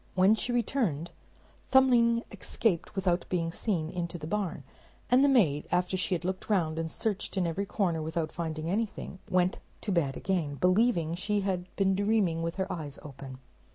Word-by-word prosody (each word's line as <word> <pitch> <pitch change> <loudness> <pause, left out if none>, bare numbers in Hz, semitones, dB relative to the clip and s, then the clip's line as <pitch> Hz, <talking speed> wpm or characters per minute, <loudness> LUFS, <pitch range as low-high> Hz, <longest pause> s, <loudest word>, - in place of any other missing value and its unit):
When 190 +3 +6
she 230 +3 -1
returned, 225 - 0 0.6
Thumbling 240 -3 +5
escaped 205 -2 -1
without 180 -2 0
being 165 -2 0
seen 165 -4 -2
into 175 0 -3
the 155 - -7
barn, 175 -4 -2 0.5
and 255 +2 +6
the 285 - +5
maid, 170 - +3
after 180 +1 +1
she 185 0 0
had 175 - -5
looked 185 +3 -3
round 165 -6 +1
and 165 0 -2
searched 205 +3 -2
in 185 - +2
every 170 +4 -2
corner, 175 -7 0
without 160 0 -2
finding 160 -2 -4
anything, 200 -1 -3
went 180 0 +2 0.2
to 205 - -2
bed 150 -7 +1
again, 170 -7 -1
believing 180 - +2
she 205 +4 0
had 185 -2 -2
been 195 -1 +2
dreaming 200 -4 +1
with 165 0 -2
her 190 0 -2
eyes 150 -5 -5
open. 135 -2 -9
180 Hz, 175 wpm, -29 LUFS, 165-205 Hz, 0.6 s, When